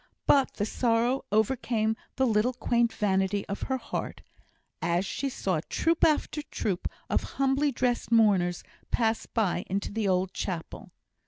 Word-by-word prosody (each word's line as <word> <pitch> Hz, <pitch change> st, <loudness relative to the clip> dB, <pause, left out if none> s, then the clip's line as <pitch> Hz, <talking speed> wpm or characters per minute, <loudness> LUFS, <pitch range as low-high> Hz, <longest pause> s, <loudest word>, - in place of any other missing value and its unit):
But 275 Hz, -2 st, +4 dB
the 205 Hz, -, -1 dB
sorrow 240 Hz, +4 st, +1 dB
overcame 220 Hz, 0 st, +1 dB, 0.2 s
the 265 Hz, -, +2 dB
little 225 Hz, +1 st, +2 dB
quaint 235 Hz, -1 st, +1 dB
vanity 195 Hz, -1 st, 0 dB
of 200 Hz, -, -4 dB
her 265 Hz, -, +1 dB
heart, -, -, -5 dB, 0.6 s
as 170 Hz, +3 st, +1 dB
she 275 Hz, +7 st, -2 dB
saw 185 Hz, -10 st, -1 dB
troop 330 Hz, 0 st, +1 dB
after 305 Hz, 0 st, +2 dB
troop 205 Hz, -9 st, -3 dB, 0.2 s
of -, -, +1 dB, 0.2 s
humbly 275 Hz, +2 st, +2 dB
dressed 245 Hz, -1 st, -1 dB
mourners 195 Hz, -6 st, +3 dB, 0.3 s
pass 225 Hz, -1 st, 0 dB
by 195 Hz, -6 st, 0 dB
into 195 Hz, +2 st, -2 dB
the 215 Hz, -1 st, -1 dB
old 185 Hz, 0 st, +1 dB
chapel. 175 Hz, -4 st, -5 dB
220 Hz, 145 wpm, -28 LUFS, 195-255 Hz, 0.6 s, But